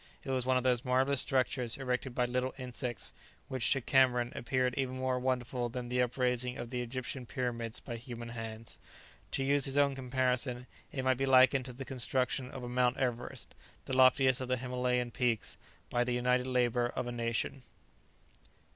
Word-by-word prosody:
It 135 - -4
was 130 -1 0
one 130 0 +4
of 125 - 0
those 125 -1 +2
marvellous 130 +2 +2
structures 125 -2 0
erected 125 -1 -2
by 125 - +2
little 125 +1 -1
insects, 125 -2 -4 0.4
which 130 -2 0
to 135 - +2
Cameron 125 -2 +3
appeared 125 +1 0
even 130 -1 -1
more 130 -1 0
wonderful 125 -1 -1
than 120 0 -5
the 125 0 +1
upraising 125 0 0
of 120 0 -6
the 125 -1 -2
Egyptian 125 +1 -5
pyramids 115 -2 -3
by 120 - -6
human 120 -1 -7
hands. 115 -1 -7 0.5
To 135 - +1
use 140 0 +3
his 135 +1 +2
own 140 -1 +4
comparison, 125 -1 -1 0.3
it 130 - -3
might 130 -1 +2
be 135 +1 0
likened 130 0 +6
to 125 - -6
the 135 +2 -7
construction 130 +1 0
of 130 -1 -8
a - - -4
Mount 125 0 +2
Everest, 125 -2 -3 0.3
the 130 - -2
loftiest 130 0 +5
of 130 - -3
the 130 0 +1
Himalayan 125 -1 -1
peaks, 120 -3 0 0.4
by 120 - +2
the 125 0 -1
united 125 +1 +2
labour 120 -1 +2
of 120 - -3
a 120 - -4
nation. 115 +3 -2
125 Hz, 180 wpm, -32 LUFS, 120-130 Hz, 0.5 s, likened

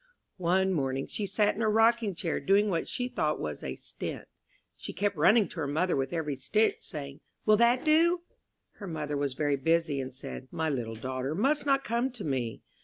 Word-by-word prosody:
One 190 +2 +2
morning 135 -3 -1
she 205 - -4
sat 205 +2 +2
in 225 - -5
her 220 - +3
rocking 225 -2 +3
chair, 165 -2 -2
doing 200 +8 +3
what 165 -2 -1
she 245 -1 -2
thought 155 -10 -1
was 75 -1 -5
a - - -4
"stint." - - -7 0.5
She - - -7
kept 205 +1 0
running 195 +8 +5
to - - -11
her 145 - -1
mother 165 +6 +1
with 135 -1 -1
every 155 -4 -2
stitch, 175 +12 +2
saying, 140 -2 -7 0.3
"Will 215 -1 +6
that 235 +4 +3
do?" 335 +3 +4 0.6
Her 200 - -7
mother 150 -3 -3
was 140 -2 -1
very 145 0 +1
busy, 160 -1 +1
and 130 0 -6
said, 130 0 -8
"My 160 -1 -1
little 115 -4 -3
daughter 130 +5 -3
must 285 - +1
not 275 -1 +3
come 235 +3 0
to 235 -5 -6
me." 125 -6 -2
170 Hz, 200 wpm, -29 LUFS, 140-215 Hz, 0.6 s, Will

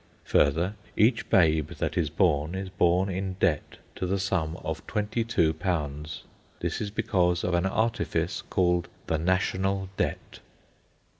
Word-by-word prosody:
Further, 80 +7 +2 0.2
each 115 +2 +3
babe 80 -4 +4
that - - -2
is 80 -4 +1
born, 80 -1 +1
is 95 0 -4
born 90 +1 +2
in 95 0 -2
debt 75 -5 0 0.2
to 90 - -2
the 95 +2 +1
sum 95 -4 -1
of - - -4
£22. 85 -8 -1 0.4
This - - -2
is 105 - -2
because 90 -4 +1
of 90 - 0
an 85 +2 +2
artifice 110 -6 0
called 90 -1 +1 0.2
the 80 - 0
National 95 +2 0
Debt. - - -3
90 Hz, 135 wpm, -27 LUFS, 80-95 Hz, 0.4 s, babe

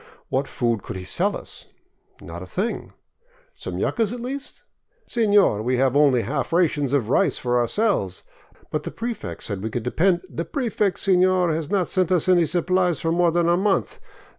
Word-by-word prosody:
What 135 +1 -1
food 115 -4 -1
could - - -7
he 95 - -6
sell - - 0
us? - - -11 0.6
Not 85 +1 -8
a 90 - -8
thing. 200 - -3 0.6
Some - - -7
yucas, 225 -3 0
at 245 - -5
least? 270 +4 -7 0.4
Seiior, 205 - +3
we 125 +2 0
have 130 0 +2
only 140 -5 +4
half 135 +5 -3
rations 155 -6 +1
of 130 -6 0
rice - - +2
for 125 0 0
ourselves. 120 - 0 0.5
But - - -1
the - - -6
prefect 225 - -6
said 100 -3 -4
we 110 - -3
could 115 +1 -4
depend... 175 +8 +1
The 170 - -4
prefect, 210 - -1
sefior, 185 -2 +3
has 155 -1 -3
not 190 -4 +1
sent 185 -2 0
us 180 -2 +3
any 175 -3 +4
supplies 180 0 +1
for 165 - -1
more 175 0 +3
than 170 0 +1
a 170 - +4
month. 195 +2 0
170 Hz, 185 wpm, -23 LUFS, 125-190 Hz, 0.6 s, only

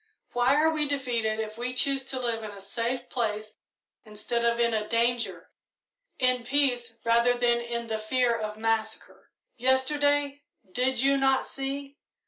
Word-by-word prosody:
Why 245 +3 +3
are 315 +2 +4
we 305 -2 +1
defeated 240 -6 -1
if 215 +1 -5
we 250 +1 -3
choose 270 +1 +2
to 265 -1 -4
live 230 -3 -2
in 215 - -5
a 200 -1 -10
safe 235 +5 -3
place 215 -3 -3 0.5
instead 220 +2 -3
of 235 0 +2
in 235 0 +3 0.2
danger 230 -6 0 0.7
in 255 -1 +2
peace 245 -3 +1
rather 235 +1 +3
than 240 -1 +2
in 235 0 -4
the 220 -1 -3
fear 240 +2 +1
of 215 -1 -4
massacre? 220 0 -2 0.3
Yesterday, 285 +3 +2 0.3
did 255 +3 0
you 275 +1 +3
not 270 -1 +2
see? 275 +1 -6
240 Hz, 150 wpm, -27 LUFS, 225-270 Hz, 0.7 s, are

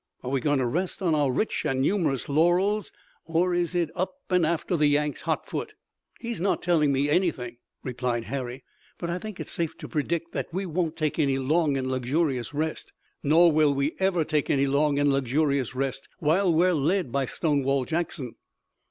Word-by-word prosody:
Are 125 - -4
we 135 -2 0
going 145 0 +2
to 130 - +1
rest 180 +10 -2
on 170 -3 +2
our 145 -3 +2
rich 215 - -1
and 130 - 0
numerous 150 - +1
laurels, 175 +7 +2 0.4
or 170 +2 +1
is 175 0 0
it 170 -3 0
up 185 +8 -2 0.2
and 180 -3 +3
after 170 +2 -1
the 150 -2 +3
Yanks 145 0 +1
hot - - -1
foot?" - - -5 0.4
"He's 235 -6 -4
not 195 - 0
telling 160 -5 +3
me 140 +1 +1
anything," 145 -8 0 0.3
replied 125 -2 -2
Harry, 130 0 -5 0.3
"but 170 -1 -3
I 175 - -2
think 215 -2 -8
it's - - -6
safe 165 -2 -2
to - - -8
predict 170 +2 -2
that - - -4
we 190 +3 -2
won't 165 -2 -1
take 155 0 -1
any 140 -3 +2
long 145 +2 +1
and 130 -1 -2
luxurious 130 0 0
rest. 155 +2 -3 0.3
Nor 165 +4 +5
will 150 -2 +3
we 140 +3 0
ever 190 -3 +2
take 150 -2 -1
any 140 -1 +3
long 140 +1 +2
and 145 -1 +3
luxurious 135 -1 0
rest 135 0 -3
while 175 +2 +2
we're 175 +3 +3
led 160 0 0
by 140 0 0
Stonewall 140 -4 0
Jackson." 160 -6 -3
150 Hz, 190 wpm, -26 LUFS, 135-175 Hz, 0.4 s, Nor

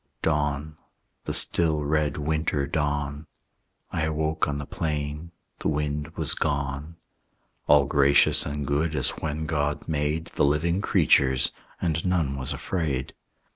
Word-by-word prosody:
Dawn, 75 0 -1 0.5
the - - -2
still 80 -3 +3
red 75 -1 0
winter 75 -1 0
dawn; 75 0 -2 0.6
I 80 - 0
awoke 80 0 0
on 75 -1 -2
the 70 - -5
plain; 75 +2 -3 0.3
the - - -2
wind 75 0 -1
was 80 -3 +1
gone; 70 +2 -2 0.7
All 75 -1 +6
gracious 70 0 +4
and 70 0 -4
good 75 +3 0
as 65 - +3
when 80 0 -4
God 75 -1 -1
made 75 +1 -1
The - - +1
living 80 +6 +2
creatures, 65 -8 +3 0.3
and 80 -2 -1
none 85 -7 0
was 65 -1 -2
afraid. 75 -8 -2
75 Hz, 135 wpm, -26 LUFS, 70-80 Hz, 0.7 s, All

